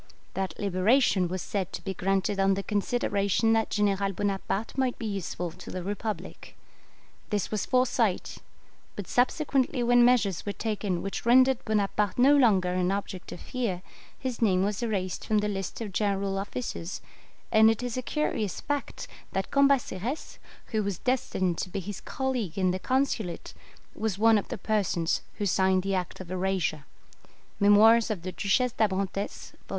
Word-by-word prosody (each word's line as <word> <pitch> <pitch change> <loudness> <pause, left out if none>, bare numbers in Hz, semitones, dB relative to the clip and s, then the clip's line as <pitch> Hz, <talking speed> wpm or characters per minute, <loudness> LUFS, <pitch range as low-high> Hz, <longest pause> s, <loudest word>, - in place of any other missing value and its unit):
That 190 -3 -3
liberation 200 +1 +3
was 185 +1 -4
said 195 -3 -3
to - - -6
be 195 - -3
granted 195 +2 0
on 195 0 +3
the 195 - -3
consideration 205 0 +1
that 225 -1 +1
General 200 -1 +1
Bonaparte 200 +2 -2
might 260 -2 0
he 230 - -4
useful 185 -4 -3
to 180 +2 -11
the 185 - -5
Republic. 205 +2 -5 0.7
This 205 -3 -1
was 215 -2 -2
foresight; 255 -1 +1 0.6
but 200 -4 -6
subsequently 260 0 +1
when 245 0 +5
measures 225 -7 +3
were 205 - -3
taken 205 -5 -2
which 195 - -4
rendered 255 +1 +5
Bonaparte 210 -2 0
no 270 +4 +6
longer 195 -9 +4
an 180 0 +1
object 195 -2 -4
of - - -8
fear, 225 -9 -3 0.3
his 255 -3 -4
name 190 -4 +3
was 205 +1 -1
erased 195 -6 -2
from 215 - +1
the 210 0 +1
list 195 +1 -4
of 210 -4 -5
general 195 -1 0
officers, 200 -3 -5 0.5
and 220 0 +7
it 225 +2 0
is 245 -2 -3
a 255 - -1
curious 240 - -2
fact 290 -1 -4 0.3
that 195 0 -2
Cambaceres, 275 - +1 0.3
who 220 -2 +1
was 200 -3 -2
destined 190 -8 -1
to 185 - -3
be 195 - -3
his 195 +1 -6
colleague 250 - -3
in 185 -1 +2
the 185 - -2
Consulate, 255 -7 -1 0.4
was 215 -3 -2
one 225 0 +5
of - - -7
the - - -5
persons 195 -6 0
who 205 - -2
signed 190 -1 +2
the 195 0 -1
act 180 -2 -3
of 185 -2 -8
erasure" 185 -5 -1 0.7
(Memoirs 215 +3 +6
of 200 -6 -3
the 185 - -4
Duchesse 240 +7 +1
d'Abrantes, 195 -2 -2 0.2
vol. - - -30
205 Hz, 165 wpm, -28 LUFS, 190-230 Hz, 0.7 s, and